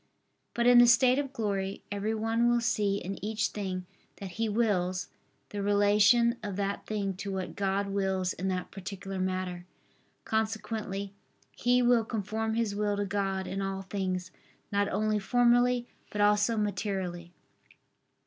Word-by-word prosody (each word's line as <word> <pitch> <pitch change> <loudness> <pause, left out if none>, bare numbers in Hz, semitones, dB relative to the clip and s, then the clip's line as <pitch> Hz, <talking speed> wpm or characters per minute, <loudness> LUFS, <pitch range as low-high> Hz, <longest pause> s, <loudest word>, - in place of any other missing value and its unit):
But 235 - +1
in 245 0 +8
the 240 - +8
state 255 +2 +5
of 275 -2 -3
glory, 200 -5 -2
every 205 +2 -1
one 225 +2 +1
will 240 0 +3
see 210 -4 +1
in 195 0 -6
each 215 +1 0
thing 185 -3 -4 0.3
that 195 -2 -8
he 225 +4 -1
wills, 185 -5 0 0.4
the 205 - -4
relation 205 +4 +4
of 205 -3 -4
that 200 0 -3
thing 200 -2 -1
to 200 +1 -4
what 190 -1 -4
God 200 0 0
wills 190 -2 0
in 190 - -4
that 185 -1 -2
particular 195 0 -6
matter. 185 -1 -3 0.6
Consequently 215 -2 -2 0.4
he 245 +1 +2
will 240 -1 +4
conform 220 0 -2
his 230 -3 0
will 205 0 0
to 205 - 0
God 195 -1 -1
in 195 +1 -3
all 195 0 -3
things 185 -2 -3 0.4
not 200 0 +1
only 215 +1 +1
formally, 245 +2 +3 0.2
but 210 - -5
also 210 +2 +3
materially. 190 -4 -2
205 Hz, 150 wpm, -29 LUFS, 195-225 Hz, 0.6 s, in